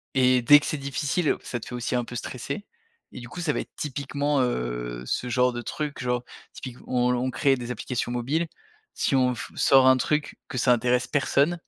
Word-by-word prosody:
et 130 -1 +4
dès 145 +4 +8
que - - -7
c'est 155 - -1
difficile, 140 +3 0
ça 120 - -4
te - - -8
fait 125 - -6
aussi 125 +1 -2
un 125 - +1
peu 120 - -9
stresser 140 - -5 0.5
et - - -8
du 120 - -9
coup, 180 - -8
ça 155 -4 0
va - - -1
être - - -11
typiquement, 145 0 -1
heu, - - -2
ce 125 - -2
genre 125 +1 +2
de 120 - -4
truc, 150 +2 -4
genre, 125 0 0 0.3
typique 125 -2 -8
où 125 - -2
on 125 0 +3
on 130 +1 -1
crée 135 +1 +3
des 125 -1 -5
applications 120 +1 -3
mobiles, 135 +8 -1 0.5
si - - 0
on 125 -1 +3
f 115 - -7
sort 135 -1 +5
un 130 - +7
truc, 150 +4 -1
que 135 - -4
ça 125 0 +4
intéresse 125 +1 +1
personne, 145 +3 +2
125 Hz, 220 wpm, -26 LUFS, 125-140 Hz, 0.5 s, dès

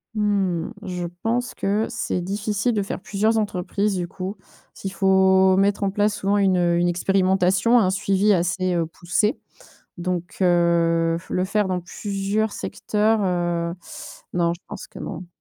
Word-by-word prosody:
mmh, 195 -5 0
je 180 -3 -4 0.2
pense 245 +2 0
que 210 +3 0
c'est 235 -6 -2
difficile 205 +5 -1
de 210 - +1
faire 195 - -5
plusieurs 215 +4 +1
entreprises, 205 0 -1
du 175 -1 -2
coup, 190 +3 -6 0.4
s'il 195 -1 -6
faut 190 -1 +4
mettre 200 +1 +2
en 200 - +2
place 205 +1 +1
souvent 200 +1 0
une, 195 -2 +3
heu, 175 -1 +2
une 175 0 +2
expérimentation, 190 +5 +3
un 190 -5 +3
suivi 195 +1 +2
assez, 180 +1 0
heu, 170 -1 +1
poussé 180 +6 -1 0.6
donc, 175 0 -3
heu, 170 -2 +3
le 180 - 0
faire 205 +1 0
dans 180 -1 -1
plusieurs 200 +3 -2
secteurs, 215 +2 0
heu, 175 -2 -1 0.6
non, 170 -1 +1
je 170 - -16
pense - - -8
que - - -11
non. 180 -1 -6
190 Hz, 155 wpm, -23 LUFS, 175-205 Hz, 0.6 s, faut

